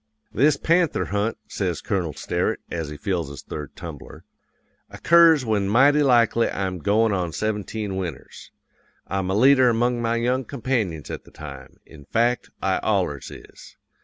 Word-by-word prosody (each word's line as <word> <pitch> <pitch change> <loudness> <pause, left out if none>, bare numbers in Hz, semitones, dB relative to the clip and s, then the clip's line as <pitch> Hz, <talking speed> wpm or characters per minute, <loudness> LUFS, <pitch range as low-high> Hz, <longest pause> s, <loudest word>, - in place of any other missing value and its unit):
"'This 140 +5 +3
panther 170 +1 +1
hunt,' 105 +3 -1
says 90 -5 -2
Colonel 90 -7 -2
Sterett, - - -2
as 80 -3 -3
he 75 - -8
fills 85 -3 -2
his 70 - -10
third 75 -3 -8
tumbler, - - -10 0.7
'occurs 165 -5 +5
when 105 -3 0
mighty 140 +7 +5
likely 120 -4 +3
I'm 95 -2 -3
goin' 110 +6 +2
on 90 -3 -1
seventeen 105 -1 -3
winters. 85 -8 -7 0.6
I'm 95 -1 -2
a 95 - 0
leader 130 +2 +5
among 120 +1 +1
my 115 0 0
young 125 +3 0
companions 115 - -3
at - - -6
the - - -17
time; - - -11
in 75 -3 -15
fact, 120 - 0
I - - +1
allers - - -1
is. - - -14
110 Hz, 155 wpm, -23 LUFS, 95-125 Hz, 0.7 s, occurs